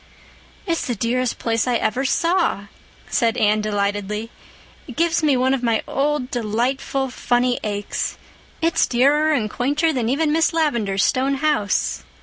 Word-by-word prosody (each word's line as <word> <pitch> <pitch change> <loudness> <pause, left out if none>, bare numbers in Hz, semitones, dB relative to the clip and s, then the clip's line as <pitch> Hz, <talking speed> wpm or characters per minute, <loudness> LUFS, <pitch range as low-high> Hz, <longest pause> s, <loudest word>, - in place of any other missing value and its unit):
"It's 335 -3 -1
the 245 - -1
dearest 245 +3 -1
place 230 0 -1
I 245 - +1
ever 250 +4 0
saw," 335 - +1 0.4
said 235 -2 +1
Anne 215 -2 +2
delightedly. 205 +1 -2 0.6
"It - - -9
gives 335 0 +1
me 295 -4 +3
one 260 +1 +2
of 270 - -1
my 230 -2 +1
old, 280 -2 -1
delightful 250 +4 -1
funny 245 0 0
aches. 205 -1 -3 0.5
It's 330 0 +2
dearer 290 +5 +3
and 245 -8 +1
quainter 290 +8 0
than 240 -4 -1
even 300 +3 +1
Miss 325 +1 +2
Lavendar's 235 -12 +1
stone 270 +2 +1
house." 265 - 0
250 Hz, 145 wpm, -21 LUFS, 220-290 Hz, 0.6 s, me